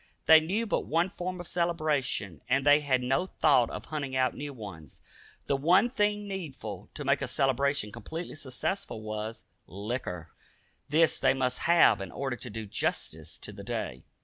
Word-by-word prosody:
They 160 Hz, 0 st, +9 dB
knew 195 Hz, +9 st, -1 dB
but 215 Hz, -, -1 dB
one 170 Hz, +4 st, +2 dB
form 180 Hz, -1 st, -5 dB
of 175 Hz, -, -6 dB
celebration, 150 Hz, -, 0 dB
and 130 Hz, +2 st, +2 dB
they 145 Hz, +1 st, +7 dB
had 130 Hz, -4 st, +1 dB
no 135 Hz, +8 st, +1 dB
thought 135 Hz, -9 st, +3 dB
of -, -, -6 dB
hunting 140 Hz, -4 st, -4 dB
out 130 Hz, -1 st, +2 dB
new 145 Hz, 0 st, -5 dB
ones. 100 Hz, -, -10 dB, 0.5 s
The 140 Hz, -, +1 dB
one 180 Hz, -, +4 dB
thing 210 Hz, -3 st, 0 dB
needful 150 Hz, -, -6 dB
to 145 Hz, -, -5 dB
make 140 Hz, +1 st, +2 dB
a 140 Hz, -, -1 dB
celebration 135 Hz, -3 st, +1 dB
completely 165 Hz, -, -6 dB
successful 135 Hz, -, -4 dB
was 110 Hz, +1 st, -5 dB, 0.2 s
liquor. 95 Hz, -, -5 dB, 0.6 s
This 160 Hz, +3 st, +4 dB
they -, -, +3 dB
must 130 Hz, -1 st, -1 dB
have 170 Hz, -, +6 dB
in 95 Hz, -, -6 dB
order 135 Hz, -2 st, -3 dB
to 125 Hz, -, -8 dB
do 110 Hz, 0 st, -5 dB
justice 100 Hz, -, -3 dB
to -, -, -8 dB
the -, -, -10 dB
day. -, -, -4 dB
140 Hz, 175 wpm, -29 LUFS, 120-165 Hz, 0.6 s, They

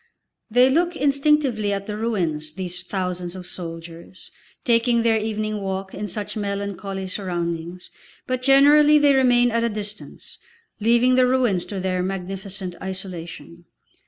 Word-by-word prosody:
They 245 Hz, +3 st, +5 dB
look 345 Hz, +4 st, +1 dB
instinctively 280 Hz, -7 st, +2 dB
at 200 Hz, 0 st, -3 dB
the 210 Hz, -, -5 dB
ruins, 170 Hz, -9 st, -2 dB
these 180 Hz, -1 st, -5 dB
thousands 180 Hz, -1 st, -4 dB
of 185 Hz, -1 st, -8 dB
soldiers, 170 Hz, 0 st, -8 dB, 0.3 s
taking 235 Hz, -1 st, +3 dB
their 225 Hz, -1 st, +3 dB
evening 215 Hz, -1 st, -3 dB
walk 190 Hz, 0 st, -4 dB
in 210 Hz, +2 st, -4 dB
such 210 Hz, +2 st, -5 dB
melancholy 200 Hz, -2 st, -4 dB
surroundings, 175 Hz, -2 st, -4 dB, 0.3 s
but 255 Hz, 0 st, -2 dB
generally 290 Hz, +3 st, +6 dB
they 290 Hz, -1 st, +5 dB
remain 245 Hz, -2 st, +4 dB
at 230 Hz, 0 st, +1 dB
a 235 Hz, -, +1 dB
distance, 210 Hz, 0 st, -7 dB, 0.4 s
leaving 235 Hz, +3 st, +3 dB
the 255 Hz, 0 st, +4 dB
ruins 245 Hz, -8 st, +1 dB
to 200 Hz, -, -5 dB
their 185 Hz, -1 st, -1 dB
magnificent 190 Hz, 0 st, -5 dB
isolation. 175 Hz, -2 st, -7 dB
200 Hz, 135 wpm, -22 LUFS, 185-240 Hz, 0.4 s, generally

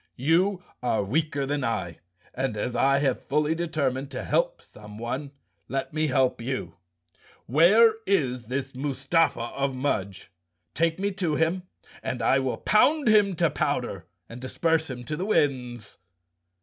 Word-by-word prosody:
"You 180 Hz, +7 st, +2 dB, 0.2 s
are 115 Hz, -4 st, +1 dB
weaker 140 Hz, +5 st, -1 dB
than 145 Hz, 0 st, -2 dB
I 85 Hz, -9 st, -2 dB, 0.3 s
and, 130 Hz, -4 st, -2 dB
as 120 Hz, +4 st, -2 dB
I 135 Hz, 0 st, +3 dB
have 140 Hz, -2 st, 0 dB
fully 150 Hz, +2 st, +1 dB
determined 145 Hz, -5 st, -2 dB
to -, -, -5 dB
help -, -, 0 dB
someone, 120 Hz, -, -7 dB, 0.4 s
let 135 Hz, +2 st, -3 dB
me 155 Hz, 0 st, +1 dB
help 130 Hz, -3 st, +1 dB
you. 115 Hz, -10 st, -4 dB, 0.7 s
WTiere 185 Hz, -, +6 dB, 0.2 s
is 130 Hz, -, 0 dB
this 135 Hz, +2 st, -3 dB
Mustafa 140 Hz, 0 st, 0 dB
of 135 Hz, -1 st, -1 dB
Mudge? 100 Hz, -10 st, -3 dB, 0.4 s
Take 165 Hz, 0 st, +1 dB
me 200 Hz, +1 st, 0 dB
to 180 Hz, -6 st, -1 dB
him 175 Hz, +4 st, 0 dB, 0.3 s
and 125 Hz, -3 st, -3 dB
I 135 Hz, +4 st, +4 dB
will 130 Hz, -1 st, -1 dB
pound 255 Hz, +5 st, +3 dB
him 205 Hz, -3 st, +4 dB
to 165 Hz, -2 st, +2 dB
powder 120 Hz, -, -2 dB, 0.2 s
and 120 Hz, +1 st, -10 dB
disperse 160 Hz, +4 st, 0 dB
him 125 Hz, -1 st, -6 dB
to 150 Hz, +5 st, -4 dB
the 180 Hz, -, -3 dB
winds." 125 Hz, -, -1 dB
140 Hz, 150 wpm, -26 LUFS, 125-165 Hz, 0.7 s, WTiere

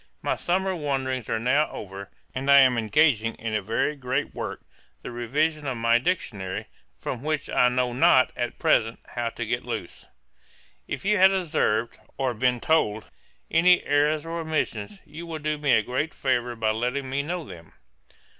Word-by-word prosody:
My -, -, 0 dB
summer 190 Hz, +2 st, 0 dB
wanderings 135 Hz, -6 st, -2 dB
are 115 Hz, -, +1 dB
now 130 Hz, +7 st, +2 dB
over, 100 Hz, -1 st, -8 dB, 0.2 s
and 135 Hz, +2 st, -3 dB
I 140 Hz, 0 st, +9 dB
am 130 Hz, -2 st, +5 dB
engaging 115 Hz, -1 st, +2 dB
in 110 Hz, -1 st, -5 dB
a 105 Hz, -, +1 dB
very 115 Hz, +8 st, -1 dB
great 135 Hz, +1 st, -2 dB
work, -, -, -5 dB, 0.4 s
the -, -, -6 dB
revision 145 Hz, +6 st, -1 dB
of 130 Hz, -3 st, -2 dB
my 115 Hz, +1 st, +3 dB
Dictionary; 105 Hz, -, -3 dB, 0.3 s
from 125 Hz, -, -5 dB
which 155 Hz, 0 st, -2 dB
I 125 Hz, -, +4 dB
know 125 Hz, 0 st, 0 dB
not, 130 Hz, 0 st, +5 dB
at 120 Hz, -1 st, -3 dB
present, 115 Hz, 0 st, +2 dB
how 120 Hz, -1 st, -2 dB
to 120 Hz, 0 st, -5 dB
get 120 Hz, +2 st, -2 dB
loose. 120 Hz, -8 st, -6 dB, 0.8 s
'If -, -, -5 dB
you 210 Hz, 0 st, +3 dB
have 190 Hz, +1 st, +7 dB
observed, 155 Hz, -, 0 dB, 0.2 s
or 130 Hz, -2 st, 0 dB
been 125 Hz, +2 st, +1 dB
told, 110 Hz, -8 st, 0 dB, 0.4 s
any 180 Hz, +2 st, +5 dB
errours 150 Hz, +2 st, +1 dB
or 165 Hz, +1 st, -4 dB
omissions, 110 Hz, -11 st, -3 dB
you 165 Hz, +3 st, -9 dB
will 165 Hz, -1 st, -4 dB
do 150 Hz, 0 st, -2 dB
me 145 Hz, -3 st, +2 dB
a 110 Hz, -, +4 dB
great 130 Hz, +7 st, -2 dB
favour 125 Hz, -2 st, 0 dB
by 110 Hz, -1 st, +1 dB
letting 125 Hz, +5 st, -2 dB
me 135 Hz, +2 st, -1 dB
know 170 Hz, +4 st, -4 dB
them. 85 Hz, -, -12 dB
130 Hz, 175 wpm, -25 LUFS, 115-150 Hz, 0.8 s, I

